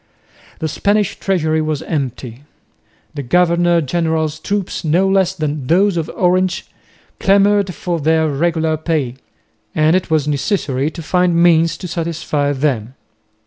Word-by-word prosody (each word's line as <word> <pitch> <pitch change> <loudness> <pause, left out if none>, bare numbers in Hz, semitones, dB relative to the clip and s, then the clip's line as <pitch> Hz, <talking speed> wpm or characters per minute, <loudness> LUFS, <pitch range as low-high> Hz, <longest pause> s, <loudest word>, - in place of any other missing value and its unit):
The 160 - -3
Spanish 205 +5 0
treasury 160 -5 0
was 155 -2 -2
empty. 130 -4 -4 0.7
The 145 - -4
governor 175 +4 +2
general's 160 0 -1
troops 200 +3 -3
no 170 +5 +2
less 190 -1 +2
than 150 -5 -3
those 190 +4 +3
of 165 -2 -2
Orange 185 0 +1 0.5
clamoured 200 -1 +3
for 175 -2 -3
their 160 +1 +2
regular 160 +1 0
pay, 150 -6 -2 0.6
and 155 +2 +3
it 185 - -1
was 155 -2 +1
necessary 140 -1 -1
to 165 +1 -9
find 180 +1 +1
means 165 -1 +3
to 180 - -7
satisfy 160 -4 -2
them. 130 -4 -1
160 Hz, 135 wpm, -17 LUFS, 150-180 Hz, 0.7 s, those